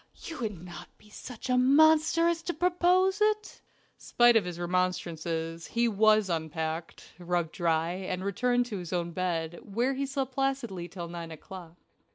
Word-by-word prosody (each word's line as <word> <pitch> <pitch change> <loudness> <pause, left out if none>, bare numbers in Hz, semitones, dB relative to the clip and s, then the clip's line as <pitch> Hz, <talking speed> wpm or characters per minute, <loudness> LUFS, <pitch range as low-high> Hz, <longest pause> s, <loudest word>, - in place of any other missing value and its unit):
"You 330 - -7
wouldn't 205 -7 -5 0.3
be 210 - -21
such 250 +3 -8
a 250 0 +3
monster 315 +5 +5
as 340 -1 0
to 345 +1 -4
propose 360 +3 +2
it." 425 0 0 0.4
Spite 240 0 +4
of 215 -5 +4
his 175 -1 -6
remonstances, 170 -2 -2
he 235 +1 +1
was 215 -1 +4
unpacked, 160 -1 -4
rubbed 175 -2 -1
dry, 165 -2 0
and 185 0 -4
returned 245 +5 +1
to 215 -5 -5
his 175 0 -7
own 170 -1 -1
bed, 170 -2 -2
where 235 +6 -1
he 275 +1 -2
slept 270 -1 -3
placidly 255 -9 -2
till 175 -1 -7
nine 170 -1 -7
o'clock. 170 +1 -10
195 Hz, 160 wpm, -29 LUFS, 170-270 Hz, 0.4 s, monster